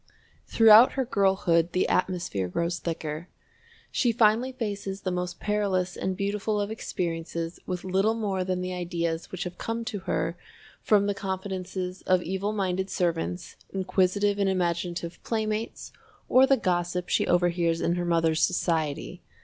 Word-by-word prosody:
Throughout 225 Hz, +2 st, +7 dB
her 265 Hz, -2 st, 0 dB
girlhood 190 Hz, -6 st, +2 dB
the 185 Hz, -, +2 dB
atmosphere 175 Hz, -, 0 dB
grows 170 Hz, -, -2 dB
thicker. 160 Hz, 0 st, -4 dB, 0.6 s
She 245 Hz, -, +2 dB
finally 230 Hz, +3 st, +3 dB
faces 205 Hz, -5 st, -4 dB
the 185 Hz, -, -2 dB
most 180 Hz, 0 st, -3 dB
perilous 195 Hz, -4 st, 0 dB
and 190 Hz, -1 st, -2 dB
beautiful 205 Hz, +1 st, -1 dB
of 205 Hz, +1 st, -2 dB
experiences 170 Hz, -4 st, -4 dB
with 180 Hz, -1 st, -3 dB
little 195 Hz, +4 st, +1 dB
more 200 Hz, -4 st, -1 dB
than 185 Hz, 0 st, -2 dB
the 185 Hz, 0 st, -3 dB
ideas 170 Hz, -2 st, -3 dB
which 185 Hz, 0 st, -4 dB
have 180 Hz, -1 st, -7 dB
come 230 Hz, 0 st, -3 dB
to 210 Hz, -2 st, -3 dB
her 170 Hz, -, 0 dB, 0.5 s
from 205 Hz, -2 st, +3 dB
the 205 Hz, -, +1 dB
confidences 190 Hz, -1 st, -4 dB
of 185 Hz, -1 st, +3 dB
evil 190 Hz, +3 st, -2 dB
minded 190 Hz, -2 st, -1 dB
servants, 90 Hz, -, -2 dB
inquisitive 195 Hz, +2 st, +1 dB
and 200 Hz, -1 st, +2 dB
imaginative 175 Hz, -1 st, -2 dB
playmates, 220 Hz, 0 st, -3 dB, 0.4 s
or 260 Hz, +1 st, +6 dB
the 270 Hz, -1 st, +4 dB
gossip 180 Hz, -2 st, -1 dB
she -, -, +1 dB
overhears 175 Hz, -1 st, +2 dB
in 170 Hz, -, +1 dB
her 175 Hz, 0 st, -1 dB
mother's 165 Hz, -2 st, +2 dB
society. 160 Hz, -5 st, 0 dB
185 Hz, 150 wpm, -27 LUFS, 175-205 Hz, 0.6 s, Throughout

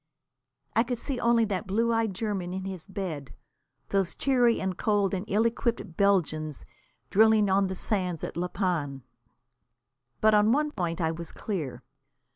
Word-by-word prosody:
I 225 Hz, -, +5 dB
could 245 Hz, +1 st, -2 dB
see 255 Hz, +2 st, -4 dB
only 235 Hz, -1 st, +3 dB
that 200 Hz, -1 st, -3 dB
blue 230 Hz, +4 st, +1 dB
eyed 225 Hz, -4 st, 0 dB
German 190 Hz, -4 st, -3 dB
in 190 Hz, 0 st, -4 dB
his 190 Hz, -3 st, -6 dB
bed, 175 Hz, -, -5 dB, 0.5 s
those 195 Hz, -2 st, 0 dB
cheery 245 Hz, -4 st, +3 dB
and 190 Hz, -1 st, -2 dB
cold 205 Hz, 0 st, +1 dB
and 190 Hz, +1 st, -2 dB
ill 215 Hz, +2 st, +2 dB
equipped 230 Hz, -6 st, -1 dB
Belgians 155 Hz, -7 st, +1 dB, 0.5 s
drilling 215 Hz, -1 st, +5 dB
on 195 Hz, 0 st, +3 dB
the 190 Hz, -, -4 dB
sands 180 Hz, -5 st, -1 dB
at -, -, -4 dB
La 175 Hz, +2 st, -1 dB
Panne. 155 Hz, -, -2 dB, 1.2 s
But 215 Hz, 0 st, +4 dB
on 210 Hz, +1 st, +5 dB
one 300 Hz, +2 st, +1 dB
point 170 Hz, -, -2 dB
I 160 Hz, -2 st, +1 dB
was 165 Hz, 0 st, -5 dB
clear. 165 Hz, -, -4 dB
195 Hz, 160 wpm, -28 LUFS, 175-220 Hz, 1.2 s, I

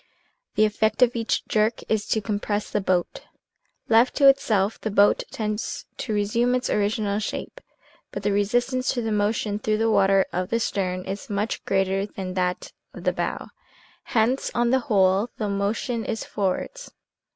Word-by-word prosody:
" -, -, -49 dB
The 215 Hz, -, +5 dB
effect 215 Hz, +3 st, +2 dB
of 245 Hz, 0 st, +2 dB
each 230 Hz, -1 st, -1 dB
jerk 215 Hz, +1 st, +1 dB
is 215 Hz, -1 st, 0 dB
to 220 Hz, -, +1 dB
compress 210 Hz, 0 st, -2 dB
the 210 Hz, -, 0 dB
boat. 180 Hz, -2 st, 0 dB, 0.7 s
Left 230 Hz, +3 st, +4 dB
to 280 Hz, -, +5 dB
itself 220 Hz, -7 st, +3 dB
the 220 Hz, -, -2 dB
boat 205 Hz, 0 st, +4 dB
tends 215 Hz, 0 st, -4 dB
to 235 Hz, -, -4 dB
resume 225 Hz, +4 st, +1 dB
its 255 Hz, 0 st, -1 dB
original 205 Hz, 0 st, 0 dB
shape, 360 Hz, -, -5 dB, 0.5 s
but 200 Hz, -, -6 dB
the 205 Hz, -, +1 dB
resistance 245 Hz, +6 st, +1 dB
to 240 Hz, -, -1 dB
the 225 Hz, -, -2 dB
motion 210 Hz, 0 st, 0 dB
through 215 Hz, 0 st, 0 dB
the 225 Hz, +1 st, +2 dB
water 195 Hz, -2 st, +4 dB
of 180 Hz, +1 st, -2 dB
the 230 Hz, -, +1 dB
stern 185 Hz, -4 st, -2 dB
is 195 Hz, +1 st, -6 dB
much 210 Hz, +2 st, -2 dB
greater 195 Hz, +1 st, +1 dB
than 190 Hz, -3 st, -6 dB
that 180 Hz, -1 st, -2 dB, 0.2 s
of -, -, -9 dB
the -, -, +1 dB
bow, -, -, -3 dB, 0.6 s
hence, 240 Hz, +3 st, +1 dB
on 240 Hz, 0 st, +2 dB
the 260 Hz, -, +4 dB
whole, 195 Hz, +1 st, +3 dB
the 215 Hz, -, -2 dB
motion 205 Hz, +4 st, -1 dB
is 220 Hz, +1 st, -3 dB
forwards. 210 Hz, -, -3 dB
210 Hz, 175 wpm, -24 LUFS, 200-230 Hz, 0.7 s, The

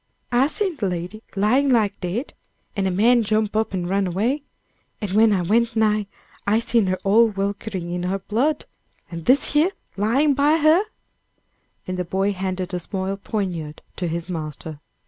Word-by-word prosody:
"I 250 Hz, +3 st, +4 dB
seen 370 Hz, 0 st, -2 dB
de 205 Hz, -, -1 dB
lady 180 Hz, +4 st, -4 dB
lying 245 Hz, +8 st, +3 dB
like 215 Hz, -5 st, +2 dB
dead, 195 Hz, +10 st, -3 dB, 0.4 s
and 195 Hz, -2 st, 0 dB
a -, -, +2 dB
man 230 Hz, +6 st, +4 dB
jump 215 Hz, 0 st, 0 dB
up 220 Hz, 0 st, +1 dB
and 180 Hz, -2 st, -2 dB
run 195 Hz, +1 st, +1 dB
away, 225 Hz, -, 0 dB, 0.6 s
and 210 Hz, -4 st, -4 dB
when 215 Hz, +2 st, +5 dB
I 190 Hz, -3 st, +1 dB
went 230 Hz, +5 st, +2 dB
nigh, 215 Hz, -2 st, +2 dB, 0.4 s
I 210 Hz, +2 st, +4 dB
seen 230 Hz, -2 st, +2 dB
her 185 Hz, 0 st, 0 dB
all 225 Hz, +4 st, +5 dB
welkering 200 Hz, -3 st, -3 dB
in 175 Hz, 0 st, -2 dB
her 195 Hz, -, 0 dB
blood, 235 Hz, +10 st, -1 dB, 0.5 s
an' 170 Hz, -1 st, -5 dB
dis 260 Hz, -, +3 dB
yer 310 Hz, +5 st, +5 dB, 0.3 s
lying 260 Hz, +9 st, +3 dB
by 290 Hz, +3 st, +3 dB
her," 315 Hz, +3 st, +5 dB, 1.0 s
and 185 Hz, 0 st, -4 dB
the -, -, +1 dB
boy 195 Hz, +3 st, 0 dB
handed 185 Hz, -1 st, -3 dB
a 180 Hz, -, -1 dB
small 190 Hz, +2 st, -3 dB
poignard 180 Hz, -7 st, -4 dB
to 180 Hz, -, -2 dB
his 170 Hz, +1 st, -3 dB
master. 155 Hz, -3 st, -6 dB
205 Hz, 175 wpm, -22 LUFS, 185-230 Hz, 1.0 s, when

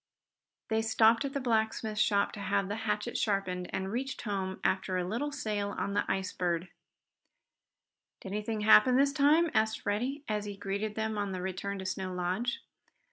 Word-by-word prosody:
They 220 Hz, 0 st, +2 dB
stopped 225 Hz, +2 st, +4 dB
at 275 Hz, -, -4 dB
the 280 Hz, -, -1 dB
blacksmith 220 Hz, -3 st, 0 dB
shop 200 Hz, -2 st, +3 dB
to -, -, -9 dB
have 200 Hz, 0 st, 0 dB
the 205 Hz, -, -2 dB
hatchet 210 Hz, +3 st, -1 dB
sharpened, 185 Hz, -4 st, -1 dB
and 190 Hz, +1 st, -3 dB
reached 260 Hz, +4 st, -3 dB
home 195 Hz, -3 st, -3 dB
after 190 Hz, 0 st, +1 dB
a 180 Hz, -, 0 dB
little 240 Hz, +9 st, -2 dB
sail 205 Hz, -6 st, -2 dB
on 200 Hz, -, -2 dB
the 205 Hz, -, 0 dB
Ice 190 Hz, -1 st, -2 dB
Bird. 175 Hz, 0 st, -1 dB, 1.5 s
"Did 190 Hz, -, -7 dB
anything 210 Hz, +1 st, -2 dB
happen 220 Hz, +4 st, +7 dB
this 280 Hz, +1 st, +4 dB
time?" 305 Hz, +3 st, +4 dB
asked 220 Hz, 0 st, +1 dB
Freddie, 250 Hz, +8 st, -2 dB
as 210 Hz, -1 st, -1 dB
he 205 Hz, -1 st, -6 dB
greeted 205 Hz, +2 st, -3 dB
them 220 Hz, -1 st, -2 dB
on 200 Hz, -2 st, -2 dB
the 185 Hz, -, -4 dB
return 190 Hz, +2 st, -3 dB
to 190 Hz, -, -6 dB
Snow 185 Hz, 0 st, -3 dB
Lodge. 185 Hz, +8 st, -1 dB
210 Hz, 180 wpm, -31 LUFS, 195-225 Hz, 1.5 s, happen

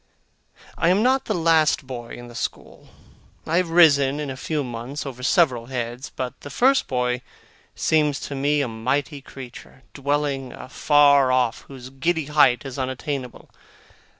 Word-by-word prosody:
I 170 Hz, -, +3 dB
am 195 Hz, +4 st, +3 dB
not 260 Hz, +2 st, +2 dB
the 215 Hz, -, -1 dB
last 160 Hz, -3 st, +2 dB
boy 120 Hz, -3 st, -7 dB
in 120 Hz, -, -10 dB
the 120 Hz, -, -12 dB
school. 120 Hz, -, -6 dB, 0.6 s
I 165 Hz, -, 0 dB
have 180 Hz, -2 st, +1 dB
risen 145 Hz, -5 st, +5 dB
in 145 Hz, -2 st, -4 dB
a -, -, -6 dB
few 150 Hz, +3 st, -3 dB
months, 125 Hz, +4 st, -6 dB
over 130 Hz, -2 st, -7 dB
several 130 Hz, -5 st, +2 dB
heads. 125 Hz, +1 st, -5 dB
But 130 Hz, -1 st, -6 dB
the 145 Hz, -, -9 dB
first 265 Hz, -, +2 dB
boy 125 Hz, -1 st, -1 dB, 0.5 s
seems 150 Hz, -3 st, +1 dB
to -, -, -6 dB
me 145 Hz, +2 st, +1 dB
a 140 Hz, -, -1 dB
mighty 135 Hz, +6 st, -2 dB
creature, 130 Hz, -1 st, -12 dB
dwelling 140 Hz, -2 st, -2 dB
afar 140 Hz, 0 st, +3 dB
off, 125 Hz, -3 st, 0 dB
whose 130 Hz, -2 st, -11 dB
giddy 160 Hz, +4 st, -1 dB
height 140 Hz, -5 st, +3 dB
is 135 Hz, 0 st, -6 dB
unattainable. 130 Hz, 0 st, -5 dB
140 Hz, 155 wpm, -23 LUFS, 125-150 Hz, 0.6 s, risen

